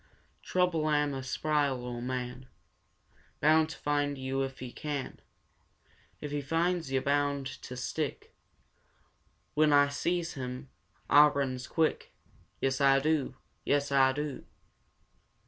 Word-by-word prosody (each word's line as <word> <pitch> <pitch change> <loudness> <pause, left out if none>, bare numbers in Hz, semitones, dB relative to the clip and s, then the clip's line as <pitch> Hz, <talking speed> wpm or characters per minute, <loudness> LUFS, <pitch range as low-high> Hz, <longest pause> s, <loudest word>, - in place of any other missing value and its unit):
Trouble 180 -4 +1
am 145 -1 +2
a 135 - -4
spry 145 +2 0
ol' 125 -2 -5
man, 125 0 -4 0.9
Bound 155 +1 +4
to - - -8
find 145 -1 0
yo' 130 +1 -2
if 135 -1 -3
he 125 -1 -7
can; 145 -2 -5 1.0
If 150 - -6
he 145 0 -1
finds 165 +1 0
yo' 135 -1 +1
bound 140 0 0 0.2
to 125 - -8
stick. 125 - -4 1.2
When 155 0 +4
Ah 145 0 +5
sees 170 +4 -1
him, 130 0 -6 0.4
Ah 150 +1 +8
runs 130 -3 -2
quick! 160 -2 -1 0.4
Yes, 135 0 0
Ah 135 0 +6
do! 145 -2 0 0.3
Yes, 145 0 +1
Ah 135 -1 +5
do!" 145 0 -4
140 Hz, 130 wpm, -30 LUFS, 130-150 Hz, 1.2 s, Ah